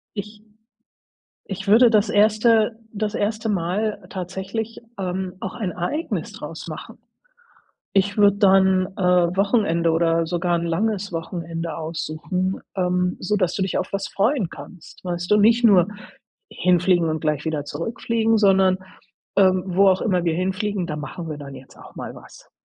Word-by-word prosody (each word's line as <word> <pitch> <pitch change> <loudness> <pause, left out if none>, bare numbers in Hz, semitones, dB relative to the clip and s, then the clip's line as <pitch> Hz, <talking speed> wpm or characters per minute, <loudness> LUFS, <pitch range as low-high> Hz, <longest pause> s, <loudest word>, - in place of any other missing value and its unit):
Ich 210 +1 -7 1.0
ich 195 0 -6
würde 230 +4 +6
das 215 -1 +3
1. 220 +1 +3
das 210 0 -3
1. 215 +1 -1
Mal 205 +3 -1
tatsächlich, 190 +4 -5 0.2
ähm, 185 -1 -3
auch 190 - -5
ein 210 -7 -3
Ereignis 290 - -3
draus - - -8
machen. - - -8 1.0
Ich 200 +1 +1
würde 205 -1 +5
dann, 190 -2 +4
äh, 180 -2 +3
Wochenende 195 -5 +2
oder 165 0 +2
sogar 175 +1 0
'n 170 - -3
langes 200 +3 -1
Wochenende 165 0 -5
aussuchen, 165 +4 -3 0.2
ähm, 180 -1 0
sodass 185 -2 0
du 195 - -1
dich 190 - -1
auf - - -3
was 195 0 -2
freuen 205 - 0
kannst, 180 -4 -12
weißt 175 -1 -4
du? 210 - +5
Nicht 230 +3 +4
nur 190 -5 +6 0.6
hinfliegen 180 -1 +2
und 155 0 -2
gleich 150 -1 -1
wieder 155 -3 -2
zurückfliegen, 225 +8 -1
sondern, 195 -3 +4 0.6
ähm: 185 -2 +4
„Wo 190 +2 +4
auch 185 0 +2
immer 180 -5 +1
wir 165 -2 +1
hinfliegen, 190 +2 -2
da 150 -3 -4
machen 155 +3 -6
wir 150 - -5
dann 140 -1 -9
jetzt 135 - -14
auch - - -14
mal - - -6
was.“ - - -15
190 Hz, 155 wpm, -22 LUFS, 170-210 Hz, 1.0 s, würde